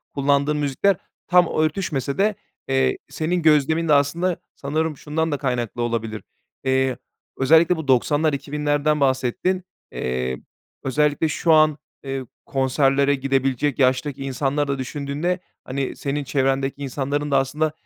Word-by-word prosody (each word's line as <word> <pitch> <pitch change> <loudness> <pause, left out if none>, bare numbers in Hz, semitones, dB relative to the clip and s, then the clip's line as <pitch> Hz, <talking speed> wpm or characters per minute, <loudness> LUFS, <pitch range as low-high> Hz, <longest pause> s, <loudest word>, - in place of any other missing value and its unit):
kullandığın 140 +1 +2
müzikler 150 +7 +2 0.3
tam 180 -1 +5
örtüşmese 155 -4 -1
de, 210 +1 +2 0.3
eee, 65 -1 +2
senin 175 +3 -1
gözlemin 160 +1 +3
de 150 - +4
aslında 165 +5 +2 0.2
sanırım 155 +2 -2
şundan 160 +3 -2
da 145 - 0
kaynaklı 125 -4 -2
olabilir. 115 -3 -2 0.4
Eee, 130 -1 +1 0.4
özellikle 160 +6 +5
bu 160 -3 -6
90'lar 145 +4 +3
2000'lerden 145 +1 0
bahsettin. 140 +8 +1 0.3
Eee, 65 0 -2 0.5
özellikle 150 +3 +1
şu 160 +2 +2
an, 155 -1 +5 0.3
eee, 135 -1 -3 0.2
konserlere 135 +1 +2
gidebilecek 135 0 0
yaştaki 130 +1 +1
insanları 135 +2 -1
da 140 -1 -2
düşündüğünde, 145 +7 -2 0.2
hani, 135 0 -3
senin 140 +1 -2
çevrendeki 135 0 0
insanların 140 +2 -2
da 135 - +4
aslında 150 +4 0
140 Hz, 130 wpm, -22 LUFS, 135-155 Hz, 0.5 s, tam